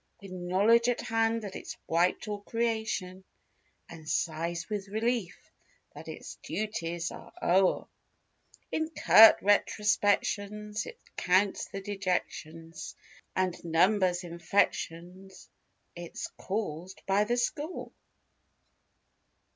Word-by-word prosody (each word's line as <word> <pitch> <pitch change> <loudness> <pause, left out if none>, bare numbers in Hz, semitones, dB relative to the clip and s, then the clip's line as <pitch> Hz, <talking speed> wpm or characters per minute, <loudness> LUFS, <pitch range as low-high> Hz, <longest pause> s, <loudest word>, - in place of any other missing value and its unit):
With 195 -2 -11
knowledge 195 +7 +3
at 245 - 0
hand 225 0 0
that 200 -2 -6
it's - - -7
wiped 175 +5 +1
all 205 -1 -4
creation 220 -5 -2 0.6
And 155 -1 -10
sighs 165 +1 -1
with 205 -2 -4
relief 220 -2 -1 0.6
that - - -11
its - - -8
duties 170 -2 -3
are - - -11
o'er. 185 +2 +3 0.9
In 315 0 -1
curt 225 -7 +8
retrospections 210 +1 +1
it 480 - -9 0.2
counts 190 +2 +2
the 195 - -6
dejections 175 -4 -4 0.4
And 185 -1 -1
numbers 180 +2 +2
infections 175 +1 -2 0.5
it's 175 -1 -6
caused 185 -3 -4
by 195 +2 +3
the 240 +3 0
score. 295 +7 -3
195 Hz, 100 wpm, -30 LUFS, 175-215 Hz, 0.9 s, curt